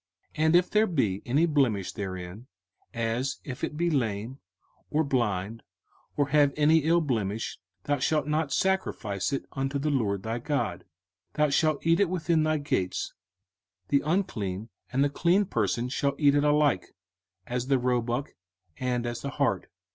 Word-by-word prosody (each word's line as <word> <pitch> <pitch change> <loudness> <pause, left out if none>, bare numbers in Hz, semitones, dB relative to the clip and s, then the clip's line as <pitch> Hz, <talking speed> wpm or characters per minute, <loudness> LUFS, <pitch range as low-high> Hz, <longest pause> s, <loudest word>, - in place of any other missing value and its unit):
05:015:021 155 - -1
And 160 +2 +4
if 180 +1 +4
there 215 +1 +4
be 110 - 0
any 145 +7 +3
blemish 130 - +1
therein, 95 +3 -6 0.4
as 115 +4 -1
if 130 -2 -7
it 150 - -2
be 170 +1 +1
lame, 115 -1 -1 0.5
or 155 +2 +2
blind, 115 -5 -1 0.6
or 145 -1 +2
have 145 0 +4
any 155 +2 +5
ill 165 +3 +3
blemish, 115 -7 -2 0.2
thou 145 -1 0
shalt 150 +3 +1
not 150 -1 0
sacrifice 140 - 0
it 135 - -2
unto 135 +1 -2
the 150 +2 0
LORD 100 -8 0
thy 115 +2 -2
God. 115 - -1
05:015:022 - - -25 0.5
Thou 150 -1 +3
shalt 155 +1 +1
eat 165 +1 +4
it 200 -4 +3
within 170 -2 +1
thy 155 0 +2
gates: 95 -11 -2 0.8
the 140 - +3
unclean 115 - -2 0.2
and 135 +2 +2
the 145 - +2
clean 175 +7 +3
person 115 - 0
shall 140 +2 -1
eat 145 -2 +4
it 145 0 +3
alike, 150 -9 +2 0.5
as 125 +1 -3
the 135 -1 +3
roebuck, 125 +2 -1 0.5
and 125 -2 -1
as 120 0 -4
the 140 - -3
hart. 135 - -1
140 Hz, 165 wpm, -28 LUFS, 115-155 Hz, 0.8 s, any